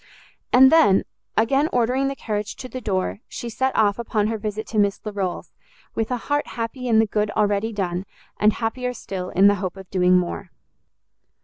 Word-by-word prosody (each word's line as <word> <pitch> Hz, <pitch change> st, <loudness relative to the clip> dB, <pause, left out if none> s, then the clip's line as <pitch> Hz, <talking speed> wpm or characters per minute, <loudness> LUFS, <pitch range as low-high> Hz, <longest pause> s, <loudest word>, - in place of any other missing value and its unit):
And 265 Hz, +1 st, +7 dB
then, 310 Hz, -13 st, +5 dB, 0.3 s
again 270 Hz, +7 st, +3 dB
ordering 250 Hz, +3 st, +1 dB
the 275 Hz, -, -2 dB
carriage 210 Hz, -4 st, -4 dB
to 255 Hz, -, -8 dB
the 255 Hz, 0 st, -7 dB
door, 195 Hz, -2 st, -1 dB
she 240 Hz, -, -6 dB
set 260 Hz, +4 st, -1 dB
off 210 Hz, 0 st, +2 dB
upon 215 Hz, -2 st, 0 dB
her 225 Hz, -, -2 dB
visit 215 Hz, 0 st, -4 dB
to 220 Hz, -, 0 dB
Miss 200 Hz, -1 st, +2 dB
Larolles, 200 Hz, -4 st, -3 dB, 0.4 s
with 225 Hz, -, -2 dB
a 250 Hz, -, 0 dB
heart 290 Hz, +4 st, -1 dB
happy 240 Hz, +2 st, -5 dB
in 225 Hz, -2 st, +3 dB
the 225 Hz, -, +5 dB
good 210 Hz, 0 st, -1 dB
already 210 Hz, +1 st, +1 dB
done, 190 Hz, -2 st, -3 dB, 0.3 s
and 210 Hz, 0 st, +4 dB
happier 250 Hz, +2 st, -3 dB
still 185 Hz, -4 st, -5 dB
in 190 Hz, -, +3 dB
the 200 Hz, -1 st, +4 dB
hope 185 Hz, 0 st, -4 dB
of 190 Hz, -1 st, -12 dB
doing 180 Hz, -1 st, +4 dB
more. 180 Hz, +1 st, -3 dB
215 Hz, 190 wpm, -23 LUFS, 200-245 Hz, 0.4 s, And